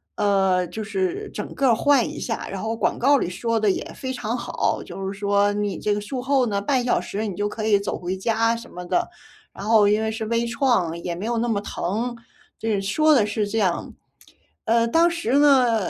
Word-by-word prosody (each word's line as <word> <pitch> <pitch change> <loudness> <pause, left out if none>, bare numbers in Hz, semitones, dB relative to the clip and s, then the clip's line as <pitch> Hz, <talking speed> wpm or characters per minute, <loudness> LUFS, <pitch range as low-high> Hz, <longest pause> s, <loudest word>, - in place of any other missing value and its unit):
呃， 190 -3 +2
就 220 +6 -6
是 190 -4 -2
整 210 - -6
个 275 - +2
儿 230 - +5
换 275 0 +3
一 - - -7
下， 225 - -4
然 195 - -5
后 225 +1 -2
广 230 - 0
告 280 +3 +5
里 175 - -2
说 230 +4 -1
得 215 - +2
也 - - -3
非 260 - -5
常 230 0 -3
好， - - -1
就 195 - -7
是 195 - -9
说 200 0 +2
你 205 -1 -2
这 210 - 0
个 205 - -3
术 255 +5 -5
后 265 -1 +2
呢， 200 -2 0
半 255 +4 +1
小 245 - +2
时 210 +2 -4
你 190 - -5
就 205 - -1
可 215 0 -5
以 205 -2 +4
走 200 - -3
回 180 +1 -3
家 230 +3 +1
什 230 - -9
么 180 - -7
的。 350 - 0 0.5
然 195 - -9
后 215 -2 +5
因 210 +1 +2
为 220 - 0
是 220 0 -4
微 230 +1 0
创， 235 - +1
也 175 - -2
没 190 - -5
有 235 -1 -1
那 240 - 0
么 215 -4 0
疼， 225 +5 -3 0.4
这 220 -3 0
说 305 +11 +3
的 225 - +4
是 210 0 -1
这 220 +2 -1
样。 185 -4 -1 0.7
呃， 230 +1 +3
当 330 +7 +4
时 335 -8 -2
呢， 250 -8 +4
220 Hz, 245 characters per minute, -23 LUFS, 200-235 Hz, 0.7 s, 儿